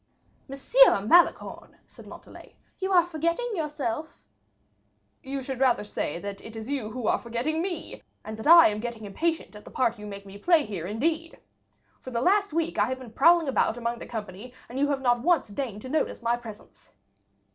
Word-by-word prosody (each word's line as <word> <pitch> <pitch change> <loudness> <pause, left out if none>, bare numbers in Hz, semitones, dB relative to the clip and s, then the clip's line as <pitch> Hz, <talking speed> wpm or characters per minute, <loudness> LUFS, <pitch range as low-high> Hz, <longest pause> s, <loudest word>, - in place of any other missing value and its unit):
"Monsieur 275 - +4
Malicorne," 345 +9 +2
said - - -16
Montalais, - - -13 0.2
"you 380 0 -2
are 355 -2 +6
forgetting 335 +8 -2
yourself." 300 - -4 1.0
"You 275 -1 -5
should 260 -1 -5
rather 255 -5 +2
say 205 -6 -4
that 200 +2 -7
it 225 - -10
is 225 +4 -6
you 260 -7 -2
who 240 +1 -6
are - - +2
forgetting 250 +7 -2
me, 350 -3 -5 0.2
and 215 - -6
that 220 - -5
I 335 -3 +9
am 210 0 -4
getting 230 -1 -6
impatient 320 +6 -2
at 210 - -11
the - - -12
part 235 -3 0
you 210 - -8
make 200 -1 -9
me 200 +1 -11
play 330 - +3
here 180 -5 -5
indeed! 315 - -2 0.6
For - - -8
the 235 -2 -2
last 400 - +2
week 330 +2 -1
I 205 - +4
have 260 +1 -3
been 250 -4 -12
prowling 335 +4 +5
about 255 -3 +1
among 235 0 -3
the - - -9
company, 215 +2 -8
and 250 +3 -6
you 285 - +2
have 280 -2 -1
not 240 -2 +2
once 340 -4 +2
deigned 210 -2 -5
to 260 - -7
notice 300 -4 -2
my 235 +1 +2
presence." 225 -3 -13
255 Hz, 195 wpm, -26 LUFS, 220-320 Hz, 1.0 s, I